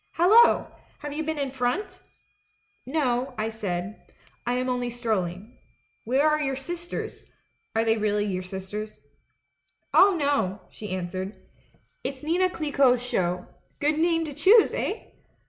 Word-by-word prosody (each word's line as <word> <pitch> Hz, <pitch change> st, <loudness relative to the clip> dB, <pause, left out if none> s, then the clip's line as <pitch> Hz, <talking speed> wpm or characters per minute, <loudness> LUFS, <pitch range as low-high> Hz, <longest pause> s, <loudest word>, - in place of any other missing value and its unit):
'Hallo! 430 Hz, +8 st, +6 dB, 0.4 s
Have 295 Hz, 0 st, -5 dB
you 305 Hz, -, -2 dB
been 315 Hz, 0 st, -2 dB
in 280 Hz, -2 st, -2 dB
front 265 Hz, +10 st, -2 dB, 0.4 s
?' -, -, -43 dB
"'No,' 260 Hz, -3 st, 0 dB
I 215 Hz, +1 st, -1 dB
said; 200 Hz, -2 st, -5 dB, 0.4 s
'I 245 Hz, -, +2 dB
am 255 Hz, +1 st, -1 dB
only 250 Hz, -1 st, -1 dB
strolling. 215 Hz, -4 st, -3 dB, 0.5 s
Where 265 Hz, +6 st, +3 dB
are 305 Hz, 0 st, +2 dB
your 270 Hz, -2 st, -1 dB
sisters 345 Hz, +5 st, -6 dB, 0.2 s
— -, -, -46 dB
are 225 Hz, -, +3 dB
they 225 Hz, 0 st, +3 dB
really 210 Hz, -1 st, +1 dB
your 185 Hz, -3 st, -2 dB
sisters?' 190 Hz, +3 st, -6 dB, 0.5 s
" -, -, -46 dB
'Oh, 390 Hz, 0 st, +7 dB
no,' 250 Hz, -10 st, +1 dB
she 210 Hz, -, -8 dB
answered. 185 Hz, +2 st, -4 dB, 0.7 s
'It's 270 Hz, +1 st, -5 dB
Nina 355 Hz, +4 st, +2 dB
Clicquot's 280 Hz, -7 st, +2 dB
show 180 Hz, -7 st, -1 dB, 0.2 s
— -, -, -41 dB
good 300 Hz, +1 st, +1 dB
name 330 Hz, 0 st, +2 dB
to 295 Hz, -, -6 dB
choose, 415 Hz, +9 st, +5 dB
eh? 425 Hz, -, -2 dB
250 Hz, 150 wpm, -26 LUFS, 210-305 Hz, 0.7 s, Oh